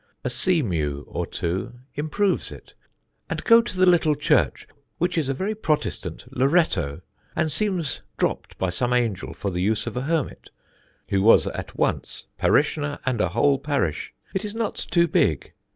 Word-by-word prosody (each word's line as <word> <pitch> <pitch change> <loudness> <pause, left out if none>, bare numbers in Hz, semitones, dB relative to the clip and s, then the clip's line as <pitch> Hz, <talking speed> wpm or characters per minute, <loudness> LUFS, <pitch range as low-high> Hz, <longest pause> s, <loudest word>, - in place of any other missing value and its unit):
A - - -1
sea 180 -5 +2
mew 75 - -2
or - - -3
two 95 +8 -3 0.2
improves 170 +7 0
it. - - -12 0.6
And - - -3
go 230 0 +7
to 230 -5 -7
the 185 - +5
little 165 -4 +4
church, 145 - +1 0.3
which 175 +1 0
is 155 -5 0
a - - +2
very 195 +9 -1
protestant 160 -8 -2
Loretto, 125 - +2 0.3
and 155 - +1
seems 175 -2 -1 0.2
dropt - - -2
by 95 -1 0
some 120 +7 0
angel 115 -6 0
for 100 - -3
the 90 0 -2
use 110 +3 +1
of 120 - -5
a 125 - -1
hermit, 155 +1 -2 0.6
who 95 - +2
was 110 +3 +6
at - - -6
once - - -1
parishioner 145 0 +2
and 125 -5 +1
a 90 - +2
whole 135 +8 +3
parish. 140 - -1 0.2
It 190 - -1
is 210 0 -5
not 225 -2 -1
too 170 -1 +1
big. 80 - +1
145 Hz, 170 wpm, -24 LUFS, -, 0.6 s, go